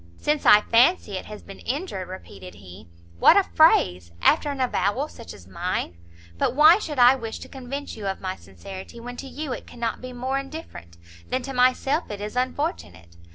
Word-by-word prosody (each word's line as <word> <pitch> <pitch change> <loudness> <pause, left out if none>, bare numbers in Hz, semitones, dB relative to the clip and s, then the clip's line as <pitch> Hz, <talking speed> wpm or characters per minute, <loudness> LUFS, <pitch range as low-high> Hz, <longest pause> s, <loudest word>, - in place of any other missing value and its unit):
"Since 300 0 0
I 210 0 +8
fancy 240 - +3
it 185 - -5
has 210 -1 -10
been 195 - -12
injured!" 260 - -4
repeated 95 - -10
he; 90 -2 -13 0.3
"what - - +7
a 400 - +5
phrase, 90 - +3
after 300 - +3
an 280 -1 -4
avowal 250 +2 0
such 235 -6 -12
as 90 - -13
mine! 90 -1 -3 0.4
But - - 0
why 315 +6 +7
should 305 -8 -5
I 245 +1 +7
wish 230 -4 -5
to - - -9
convince 275 +2 -7
you 210 -3 -6
of 190 - -3
my 185 0 -4
sincerity, 195 +5 -11
when 245 +1 -8
to 275 - -7
you 280 0 -5
it - - -8
cannot 235 -1 -4
be 255 0 -7
more 260 +2 -2
indifferent, 270 - -9 0.3
than 255 0 -1
to 270 - -6
myself 255 +5 +2
it 205 -1 -6
is 210 +2 -6
unfortunate! 255 - -3
245 Hz, 195 wpm, -24 LUFS, 190-280 Hz, 0.4 s, I